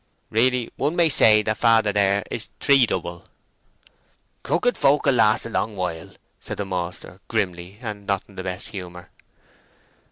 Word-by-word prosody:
"Really 125 Hz, +1 st, +1 dB
one 150 Hz, +4 st, -1 dB
may 170 Hz, -2 st, +3 dB
say 105 Hz, -6 st, +6 dB
that 110 Hz, +1 st, -2 dB
father 115 Hz, -3 st, +3 dB
there 100 Hz, 0 st, +2 dB
is -, -, -5 dB
three 135 Hz, -4 st, +4 dB
double." 85 Hz, -2 st, -4 dB, 1.2 s
"Crooked 245 Hz, +8 st, 0 dB
folk 145 Hz, +1 st, +2 dB
will 140 Hz, -, +4 dB
last 110 Hz, -2 st, +3 dB
a -, -, -5 dB
long 110 Hz, -1 st, -2 dB
while," 90 Hz, -4 st, -4 dB, 0.3 s
said -, -, -7 dB
the 100 Hz, -, -3 dB
maltster, 90 Hz, -1 st, -5 dB
grimly, 95 Hz, -3 st, -3 dB
and 105 Hz, -3 st, -7 dB
not 100 Hz, -2 st, 0 dB
in 100 Hz, -, -18 dB
the 95 Hz, -, -5 dB
best 95 Hz, 0 st, -3 dB
humour. 90 Hz, -2 st, -9 dB
105 Hz, 160 wpm, -23 LUFS, 95-120 Hz, 1.2 s, say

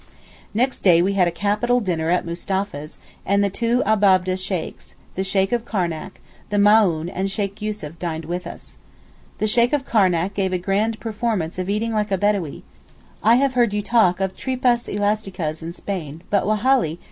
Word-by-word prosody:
Next 255 Hz, +4 st, +1 dB
day 175 Hz, -3 st, +5 dB
we 195 Hz, +2 st, +1 dB
had 185 Hz, -3 st, +3 dB
a 170 Hz, 0 st, -4 dB
capital 215 Hz, +5 st, +1 dB
dinner 170 Hz, -7 st, -1 dB
at 180 Hz, 0 st, +1 dB
Mustapha's, 170 Hz, -3 st, -4 dB, 0.3 s
and 200 Hz, +1 st, +2 dB
the 200 Hz, -, 0 dB
two 235 Hz, +4 st, +1 dB
Abab'deh 190 Hz, -4 st, +3 dB
Sheykhs, 185 Hz, -2 st, -5 dB, 0.2 s
the 190 Hz, -, -2 dB
Sheykh 195 Hz, 0 st, +1 dB
of 240 Hz, -2 st, 0 dB
Karnac, 175 Hz, -9 st, -3 dB, 0.3 s
the 205 Hz, -, -1 dB
Maōhn 200 Hz, -6 st, +4 dB
and 195 Hz, +1 st, -1 dB
Sheykh 200 Hz, +1 st, -3 dB
Yussuf 205 Hz, -7 st, -5 dB
dined 165 Hz, -2 st, -4 dB
with 175 Hz, +2 st, -4 dB
us. -, -, -11 dB, 0.6 s
The -, -, 0 dB
Sheykh 235 Hz, +4 st, +2 dB
of 285 Hz, -2 st, 0 dB
Karnac 190 Hz, -5 st, +2 dB
gave 190 Hz, -2 st, -1 dB
a -, -, +2 dB
grand 205 Hz, +5 st, -1 dB
performance 215 Hz, -7 st, -2 dB
of 185 Hz, +1 st, -3 dB
eating 220 Hz, +3 st, -1 dB
like 210 Hz, -1 st, 0 dB
a 195 Hz, -, +2 dB
Bedawee. 195 Hz, -7 st, -1 dB, 0.6 s
I 225 Hz, +2 st, +5 dB
have 270 Hz, +1 st, +2 dB
heard 240 Hz, -4 st, +2 dB
you 205 Hz, -, -1 dB
talk 200 Hz, -6 st, +3 dB
of 190 Hz, -1 st, -2 dB
tripas 250 Hz, -2 st, 0 dB
elasticas 195 Hz, -6 st, -2 dB
in 165 Hz, +1 st, -5 dB
Spain 170 Hz, -4 st, -6 dB
but 200 Hz, -1 st, +2 dB
Wallahi! 215 Hz, -, +2 dB
200 Hz, 180 wpm, -22 LUFS, 180-215 Hz, 0.6 s, day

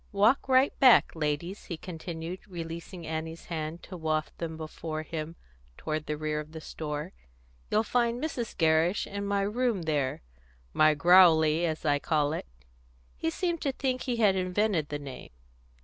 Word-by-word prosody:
Walk 215 Hz, +7 st, +3 dB
right 260 Hz, +2 st, +5 dB
back, 255 Hz, -3 st, +7 dB
ladies," 160 Hz, +5 st, -2 dB
he 170 Hz, -, -5 dB
continued, 165 Hz, +1 st, -6 dB
releasing 170 Hz, 0 st, -7 dB
Annie's 160 Hz, +1 st, -5 dB
hand 160 Hz, 0 st, -5 dB
to 185 Hz, -, -9 dB
waft 155 Hz, -2 st, -2 dB
them 160 Hz, -1 st, -4 dB
before 155 Hz, 0 st, -5 dB
him 160 Hz, +1 st, -5 dB, 0.4 s
toward 155 Hz, 0 st, -3 dB
the 150 Hz, -, -2 dB
rear 155 Hz, 0 st, -2 dB
of 150 Hz, +1 st, -8 dB
the 160 Hz, -, -6 dB
store. 155 Hz, +2 st, -5 dB, 0.6 s
"You'll 215 Hz, -, +2 dB
find 235 Hz, +1 st, +1 dB
Mrs. 255 Hz, -6 st, -4 dB
Gerrish 160 Hz, +3 st, +3 dB
in 200 Hz, 0 st, -4 dB
my 200 Hz, 0 st, +1 dB
room 215 Hz, -1 st, 0 dB
there 145 Hz, -, -1 dB, 0.5 s
my 155 Hz, 0 st, +5 dB
Growlery, 165 Hz, 0 st, +6 dB
as 160 Hz, -1 st, -4 dB
I 145 Hz, -1 st, +3 dB
call 150 Hz, -1 st, +1 dB
it." -, -, -5 dB, 0.7 s
He 160 Hz, -, -1 dB
seemed 340 Hz, -, -2 dB
to 275 Hz, -, 0 dB
think 260 Hz, -1 st, -2 dB
he 250 Hz, -, -1 dB
had 210 Hz, -4 st, +4 dB
invented 185 Hz, -3 st, 0 dB
the 145 Hz, -, -2 dB
name. 140 Hz, -3 st, -9 dB
165 Hz, 165 wpm, -29 LUFS, 155-200 Hz, 0.7 s, back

